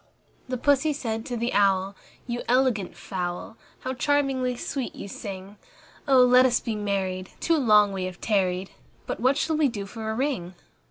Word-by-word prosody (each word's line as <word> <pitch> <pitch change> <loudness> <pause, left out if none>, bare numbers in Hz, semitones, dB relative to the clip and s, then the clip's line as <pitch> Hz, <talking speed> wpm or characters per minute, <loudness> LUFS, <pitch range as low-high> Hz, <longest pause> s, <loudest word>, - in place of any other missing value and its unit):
II 255 - -1
Pussy 285 +4 +2
said 225 -5 -4
to 245 - -3
the 235 +2 -1
Owl, 195 -1 +2 0.3
"You 240 -1 -3
elegant 245 -6 +1
fowl, 180 +2 -5 0.3
How 260 - -3
charmingly 265 -2 +1
sweet 260 +1 -4
you - - -7
sing! 195 0 -8 0.5
Oh! 260 -2 +6
let 250 +1 +6
us 245 -2 +3
be 230 - -3
married; 190 -3 -2
too 335 -1 +2
long 210 -6 +5
we 190 -1 -2
have 185 -1 -7
tarried; 190 -3 0 0.3
But - - -4
what 260 +4 +3
shall 315 0 0
we 305 -2 +4
do 210 -6 -4
for 220 +2 -6
a 220 - -2
ring?" 220 -9 -2
225 Hz, 175 wpm, -26 LUFS, 195-260 Hz, 0.5 s, Oh